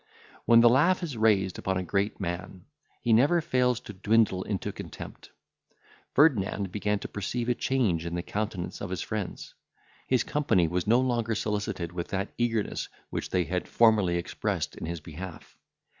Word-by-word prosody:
When 115 0 +7
the 120 - +7
laugh 170 +10 +3
is 155 -7 -4
raised 105 -4 +2
upon 95 0 -1
a 90 - -1
great 100 +3 -1
man, 90 0 -5 0.4
he 120 - +3
never 145 +10 +5
fails 125 -5 +1
to 105 - -9
dwindle 100 -1 +2
into 95 -1 -3
contempt. - - -9 0.9
Ferdinand 105 - +3
began 105 +1 0
to - - -4
perceive 115 +4 -3
a - - +4
change 115 -11 0
in 85 - -3
the 85 - -2
countenance 100 -4 -4
of 95 - -4
his 95 -2 -3
friends. 105 -4 -5 0.5
His 130 -2 +2
company 115 - +2
was 90 +2 -2
no 120 +3 +5
longer 120 -3 0
solicited 105 -5 -2
with 85 -1 -4
that 95 +1 -3
eagerness 115 -3 -1 0.2
which - - -3
they 90 - +1
had 90 +2 -3
formerly 105 -7 +4
expressed 85 - -2
in - - -6
his 85 -1 -4
behalf. 85 +4 -9
105 Hz, 170 wpm, -28 LUFS, 90-120 Hz, 0.9 s, When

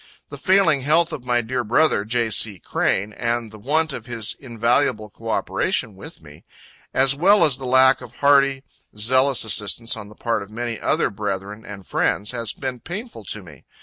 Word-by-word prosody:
The - - -8
failing 185 -7 +3
health 155 +5 +2
of 125 - -6
my 120 -1 +1
dear 125 +2 -3
brother, 120 0 +2
J. 115 0 0
C. 105 -1 +3
Crane,[A] 100 +3 -1
and 120 -2 -2
the 110 - -12
want 155 +6 0
of 120 - -7
his 115 -3 -1
invaluable 115 -3 0
co 115 +3 -9
operation 110 -1 0
with 95 -3 -11
me, 75 -1 -15 0.5
as 135 +1 +3
well 190 +5 +5
as 140 -4 +1
the 130 - -6
lack 130 +1 +5
of 120 -2 -11
hearty, 140 -1 +3 0.3
zealous 130 +4 +3
assistance 110 +2 0
on 105 -2 -9
the 105 - -15
part 115 -1 -1
of 100 - -9
many 115 0 -5
other - - 0
brethren 100 +1 -5
and 100 -2 -10
friends, 105 +2 0
has 115 -3 -4
been 130 -2 -5
painful 190 - -8
to 105 +1 -5
me. 75 -7 -15
120 Hz, 185 wpm, -22 LUFS, 105-135 Hz, 0.5 s, well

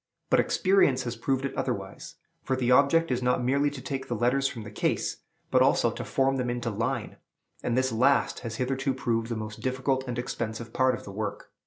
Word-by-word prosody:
But - - +5
experience 185 -9 +3
has 120 -1 -4
proved 135 +3 -1
it 135 - -3
otherwise; - - -4 0.3
for 130 - -1
the 125 -1 +1
object 145 +4 +4
is 125 0 0
not 125 0 +1
merely 140 +3 +2
to 140 -2 -8
take 135 0 -4
the 120 - -2
letters 125 +4 +2
from 115 -5 -6
the 105 - -9
case, - - -1 0.3
but - - +4
also - - +4
to - - -6
form 135 0 +1
them 125 -1 -1
into 120 -1 -2
line; 115 +2 -2 0.4
and 120 0 -1
this 130 0 +2
last 130 +5 +2
has 115 -2 -5
hitherto 135 +2 -1
proved 115 -3 -1
the 115 - -2
most 105 -1 -6
difficult 130 +1 0
and 120 -1 -3
expensive 115 -2 -4
part 130 -1 +3
of - - -10
the 100 - -8
work. 105 +1 -5
125 Hz, 210 wpm, -27 LUFS, 115-135 Hz, 0.4 s, But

